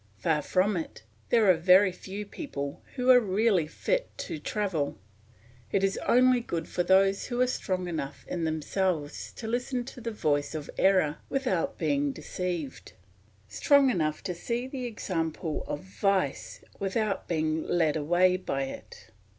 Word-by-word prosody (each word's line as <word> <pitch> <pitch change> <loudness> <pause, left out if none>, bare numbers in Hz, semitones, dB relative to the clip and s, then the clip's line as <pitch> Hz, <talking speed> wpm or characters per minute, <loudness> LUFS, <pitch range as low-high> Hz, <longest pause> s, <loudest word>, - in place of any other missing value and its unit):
Far 150 +7 +1
from 190 +6 +1
it; 160 -8 -6 0.3
there 225 -3 +4
are 185 - +8
very 185 +4 +5
few 195 +3 -7
people 140 - -6
who 255 -1 +4
are 250 - +8
really 200 -5 +2
fit - - -1
to 155 - -5
travel; 165 - -2 0.7
it 195 - +1
is 195 0 +1
only 255 0 +5
good 165 -8 -4
for - - -1
those 195 +2 +3
who 245 -1 -3
are 255 - +5
strong 185 -7 -2
enough 155 -5 -5
in 175 -2 -3
themselves 160 0 -1
to 230 - -8
listen 245 +2 -2
to 255 0 -10
the 230 - -3
voice 150 -8 0
of 150 -2 -5
error 185 -6 +3
without 270 +1 -1
being 285 0 +1
deceived, 180 - -5 0.5
strong 280 - +4
enough 155 -7 -1
to 190 -2 -2
see 235 +8 -3
the 260 -1 -5
example 165 -8 -3
of 145 - -4
vice 190 -5 -1 0.2
without 200 +1 -1
being 160 -1 0
led 160 -4 +2
away 175 +4 +3
by 135 -7 -2
it. 135 - -9
185 Hz, 155 wpm, -28 LUFS, 160-235 Hz, 0.7 s, are